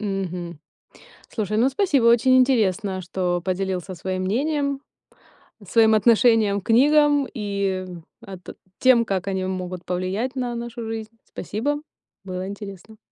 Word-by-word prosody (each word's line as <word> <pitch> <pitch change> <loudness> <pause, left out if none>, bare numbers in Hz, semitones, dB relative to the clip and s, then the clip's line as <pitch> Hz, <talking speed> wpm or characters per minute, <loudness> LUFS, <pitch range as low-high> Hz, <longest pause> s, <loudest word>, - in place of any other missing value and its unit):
Мгм. 180 -5 -4 0.7
Слушай, 215 -1 -3
ну 245 +4 +4
спасибо, 280 - +1
очень 240 +2 +5
интересно, 205 -7 +1
что 175 0 -2
поделился 185 0 -2
своим 185 +1 -4
мнением, 280 +5 -1 0.9
своим 225 0 +4
отношением 220 -2 +4
к - - -18
книгам 290 +3 +4
и, 200 -4 -2 0.4
а, 195 -4 -9
т 180 - -11 0.3
тем, 245 -3 +5
как 190 -2 -2
они 190 -1 -1
могут 185 -1 -5
повлиять 190 +8 -2
на 245 -2 -2
нашу 235 0 -6
жизнь. 220 -1 -5 0.2
Спасибо, 285 +8 -3 0.5
было 185 0 -5
интересно. 200 +1 -9
210 Hz, 130 wpm, -23 LUFS, 185-240 Hz, 0.9 s, очень